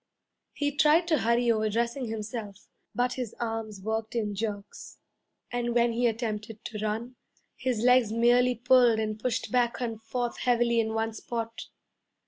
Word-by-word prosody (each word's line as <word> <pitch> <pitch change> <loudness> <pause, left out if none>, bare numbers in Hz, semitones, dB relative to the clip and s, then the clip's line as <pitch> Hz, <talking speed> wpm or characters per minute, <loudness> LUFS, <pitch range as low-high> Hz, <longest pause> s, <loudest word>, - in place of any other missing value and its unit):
He 290 -1 -1
tried 310 +3 +4
to 315 - +3
hurry 235 +1 +2
over 215 -1 +1
dressing 235 +4 -1
himself; 215 -2 -6 0.3
but 245 +1 +1
his 245 -4 -5
arms 225 -3 -3
worked 220 +2 -3
in 210 -3 -1
jerks, 205 -1 -5 0.5
and 240 -1 -1
when 235 -1 +3
he 240 +1 +2
attempted 220 -1 -4
to 215 - -5
run, 225 +4 -3 0.4
his 250 -4 -1
legs 250 -2 +4
merely 245 +2 +4
pulled 245 -1 +5
and 215 -1 -2
pushed 245 +1 -2
back 245 -1 +1
and 225 -3 -3
forth 240 +2 -3
heavily 235 -1 +2
in 220 0 0
one 225 0 -1
spot. 230 0 -5
230 Hz, 155 wpm, -28 LUFS, 220-245 Hz, 0.5 s, pulled